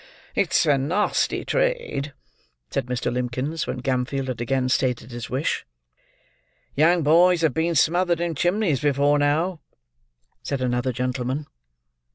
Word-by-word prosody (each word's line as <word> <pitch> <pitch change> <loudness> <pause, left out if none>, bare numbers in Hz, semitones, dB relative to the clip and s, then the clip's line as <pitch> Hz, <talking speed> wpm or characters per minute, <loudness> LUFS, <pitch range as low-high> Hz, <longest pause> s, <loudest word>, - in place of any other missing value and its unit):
"It's - - +2
a 145 -3 +3
nasty 175 +10 0
trade," - - -1 0.6
said - - -2
Mr. 125 -1 -2
Limbkins, 125 +6 -2
when 125 - -4
Gamfield 130 +1 -1
had 120 -2 -4
again 130 +1 0
stated 125 -2 0
his 120 0 -6
wish. 130 +4 -1 1.1
"Young 165 +3 +4
boys 170 +3 +5
have 160 -5 +2
been 165 +3 0
smothered 175 +3 +2
in 170 -1 -1
chimneys 175 - +1
before 145 0 +2
now," 155 +5 +1 0.8
said 140 - -3
another 125 0 0
gentleman. 125 +3 -2
145 Hz, 130 wpm, -23 LUFS, 125-170 Hz, 1.1 s, boys